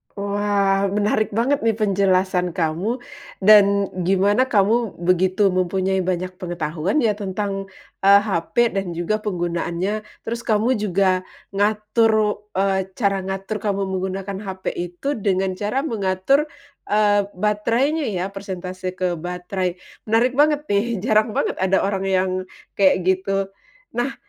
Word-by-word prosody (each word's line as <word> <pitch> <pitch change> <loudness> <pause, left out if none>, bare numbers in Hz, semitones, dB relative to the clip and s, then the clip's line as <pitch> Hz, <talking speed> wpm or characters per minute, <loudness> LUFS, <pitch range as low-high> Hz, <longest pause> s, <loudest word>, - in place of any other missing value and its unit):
Wah, 200 -1 +1
menarik 210 +1 0
banget 270 +5 +2
nih 225 - +3
penjelasan 190 -4 +1
kamu 180 +9 -1 0.4
dan 200 -1 +6 0.2
gimana 205 +7 +3
kamu 225 0 +2
begitu 185 +3 +2
mempunyai 185 +1 0
banyak 185 0 -2
pengetahuan 175 - -1
ya 220 - +3
tentang, 195 -1 -3 0.4
eee, 200 +1 +8
HP 220 +5 +1
dan 190 -3 -3
juga 195 +6 -1
penggunaannya. 180 +1 -2 0.2
Terus 230 +1 -3
kamu 220 +2 +2
juga 190 -2 +2 0.3
ngatur, 215 +1 +2 0.2
eee, 190 -1 +1
cara 200 -3 +1
ngatur 195 +2 -3
kamu 200 -1 -1
menggunakan 190 +1 -3
HP 190 0 -4
itu 175 +10 -3
dengan 190 -1 0
cara 210 +9 -2
mengatur, 225 +4 +1 0.4
eee, 205 -1 +3
baterainya 230 - 0
ya, 185 -3 -2
persentase 185 -2 -6
ke 180 -3 -1
baterai, 180 +1 -3 0.3
menarik 230 +3 +3
banget 295 +2 +2
nih, 200 +3 +2 0.2
jarang 215 -1 +2
banget - - -1
ada 190 0 +2
orang 195 -1 -1
yang 190 -1 +2 0.5
kayak 185 -2 +4
gitu. 195 +1 0 0.4
Nah, 245 +3 -2
195 Hz, 125 wpm, -21 LUFS, 185-215 Hz, 0.5 s, eee